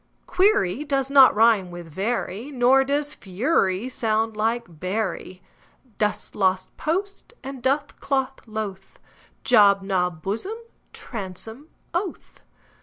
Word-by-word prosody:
Query 365 - +2
does 275 -2 -1
not 270 -4 +7
rime 215 -4 +4
with 175 -1 -9
very, 205 - -3
Nor 265 0 +4
does 290 +2 -1
fury 195 - 0
sound 225 -3 -1
like 225 +3 0
bury. 185 -1 -3 0.6
Dost, 210 -1 -1
lost, 190 -2 0
post 395 +8 -3
and 270 -1 -7
doth, 280 +3 -1
cloth, 270 -1 -1
loth; 205 -3 -6 0.4
Job, 200 -5 +5
Job, 180 -4 -1
blossom, 230 - -3 0.3
bosom, 220 - -8 0.3
oath. 355 +1 -4
225 Hz, 110 wpm, -24 LUFS, 195-275 Hz, 0.6 s, not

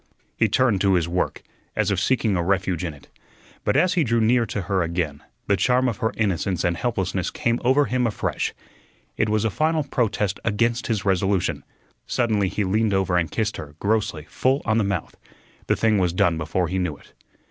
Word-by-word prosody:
He 115 - +2
turned 110 -3 +2
to 95 -2 +4
his 85 -2 +1
work, 90 +1 -2 0.3
as 105 -2 +1
if 95 - +1
seeking 110 -2 +1
a 90 - +1
refuge 95 -1 0
in 85 -4 -4
it. 70 - -18 0.6
But - - +1
as 185 0 +3
he 175 -3 +2
drew 115 -3 +1
near 115 +1 +3
to 100 -1 -3
her 95 +1 0
again, 85 -4 -2 0.2
the 100 - +2
charm 125 +6 +2
of 115 -5 -1
her 110 - 0
innocence 95 -4 0
and 85 -1 +1
helplessness 95 -4 -1
came 115 0 -1
over 135 +4 +4
him 125 -2 +1
afresh. 110 - -2 0.6
It 110 - +1
was 110 0 +1
a 110 - +1
final 155 +5 +1
protest 110 -7 -1
against 115 +2 0
his 105 -4 -1
resolution. 95 -4 +1 0.4
Suddenly 110 -5 +1
he 105 - -1
leaned 105 +2 +1
over 95 -2 +1
and 85 -2 +1
kissed 110 -1 -2
her, 75 0 -9
grossly, 100 -6 -1
full 135 +2 0
on 110 0 +2
the - - +2
mouth. 100 -5 -3 0.5
The - - +3
thing 110 -2 +2
was 90 -2 +1
done 90 -2 +2
before 80 +3 -1
he 95 +3 -2
knew 85 -5 -2
it. - - -21
100 Hz, 200 wpm, -23 LUFS, 90-115 Hz, 0.6 s, to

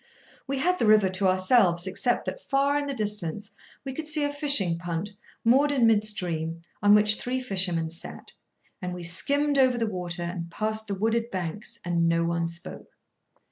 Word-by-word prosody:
We 275 +1 -2
had 360 +6 0
the 225 - +1
river 210 -3 +5
to 190 +1 0
ourselves, 185 -1 +3
except 200 +6 -1
that, - - -5
far 275 +1 +2
in 290 0 -1
the 280 - -3
distance, 205 -3 -2 0.3
we 265 - -5
could 310 +3 -6
see 305 -1 +1
a 290 0 -1
fishing 280 - +3
punt, 175 +3 -4 0.3
moored 275 +5 +4
in 260 -5 +2
mid 220 -2 +4
stream, 170 -5 -1 0.2
on 205 0 +6
which 210 0 +4
three 255 +1 -2
fishermen 180 -8 -1
sat; 165 - -9 0.5
and 180 -1 -4
we 180 - -8
skimmed 280 +12 +1
over 255 -2 +3
the 230 - 0
water, 180 -4 -4
and 170 -1 -5
passed 215 +4 -2
the 200 - -3
wooded 225 +3 -1
banks, 190 +5 -5
and 170 -1 +1
no 165 0 +1
one 170 0 -1
spoke. 170 +2 -9
205 Hz, 185 wpm, -26 LUFS, 175-255 Hz, 0.5 s, on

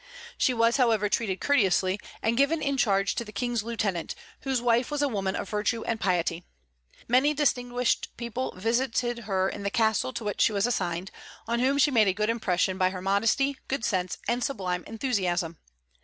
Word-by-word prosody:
She - - +2
was, 230 0 +2
however, 225 -5 +2
treated 195 -4 -1
courteously, 195 -7 +2 0.2
and 225 +1 +2
given 280 +5 +2
in 280 -2 -1
charge 200 -6 +2
to - - -3
the 210 - -11
King's 240 +2 -1
lieutenant, 210 -7 -2 0.2
whose 265 -2 -1
wife 240 +1 +2
was 295 -1 -1
a - - +3
woman 195 -6 -2
of - - -4
virtue 215 +2 -1
and 225 -1 -2
piety. 175 -2 0 0.6
Many 265 +5 +3
distinguished 245 -4 0
people 235 +2 -3
visited 235 +2 0
her 190 -2 +1
in - - -5
the 200 - -1
castle 220 +3 +1
to 235 -1 -5
which 205 -1 -2
she 220 - +4
was 200 +1 +1
assigned, 185 -6 -2 0.4
on 235 +1 0
whom 265 +3 +2
she 285 +1 +4
made 220 -5 +4
a 190 - +3
good 210 +3 0
impression 190 -4 0
by 185 0 +3
her 185 0 -6
modesty, 225 +9 +1
good 265 -4 -2
sense, 185 -2 -1
and 240 +1 0
sublime 185 -8 -2
enthusiasm. 185 - -1
225 Hz, 185 wpm, -27 LUFS, 195-245 Hz, 0.6 s, she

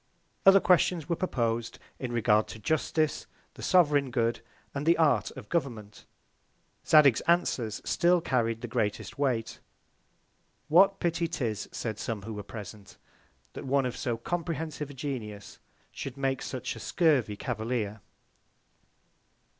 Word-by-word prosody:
Other 195 0 +9
Questions 180 -3 +2
were 170 - 0
propos'd 120 -10 -1 0.2
in 125 -2 -4
regard 110 -2 +3
to - - -8
Justice, 155 +4 0 0.3
the - - -12
sovereign 145 -7 +3
Good, 115 -2 0 0.3
and 140 +2 -4
the 170 - +5
Art 155 -3 +3
of 120 -6 -9
Government. 115 -10 -3 0.8
Zadig's 145 -6 +6
Answers 130 -11 +1
still 175 0 +3
carried 115 -7 0
the 120 - -4
greatest 105 +3 -2
Weight. 125 -6 -1 1.1
What 195 +5 +5
Pity 170 0 0
'tis, 120 - -3
said 110 -3 -4
some 110 -4 -4
who 110 +2 -6
were 105 - -5
present, 105 -1 -10 0.6
that - - -7
one 135 0 +2
of 125 - -3
so 120 -2 -2
comprehensive 160 +1 -4
a 140 - -10
Genius, 115 -7 -6 0.3
should 135 -1 -7
make 135 -1 -1
such 130 - -4
a - - -9
scurvy 140 - +2
Cavalier? 110 -2 -3
130 Hz, 135 wpm, -29 LUFS, 115-160 Hz, 1.1 s, Other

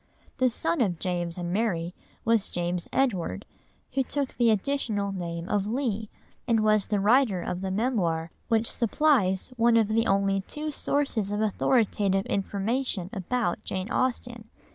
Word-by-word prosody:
The 255 -1 +4
son 170 -6 0
of 185 -7 +1
James 175 -1 -2
and 175 0 -3
Mary 180 -5 0 0.3
was 230 -3 +2
James 175 0 -2
Edward, 190 - 0 0.5
who 270 - +2
took 275 +1 -2
the 235 -2 +3
additional 215 -2 0
name 170 -2 -4
of 205 0 0
Leigh, 220 -3 -2 0.4
and 230 -2 +3
was 215 -2 +3
the 210 -2 +1
writer 220 -1 +3
of 180 0 -3
the 190 - -2
Memoir 185 -7 0 0.2
which 225 0 +1
supplies 235 -6 +2
one 230 0 +4
of 220 -2 +3
the 225 +1 +2
only 195 0 +2
two 300 +9 -5
sources 275 -9 -1
of 205 0 -2
authoritative 205 -2 +1
information 200 0 -1
about 205 0 -1
Jane 190 +4 -4
Austen. 240 -3 -2
210 Hz, 150 wpm, -27 LUFS, 185-240 Hz, 0.5 s, The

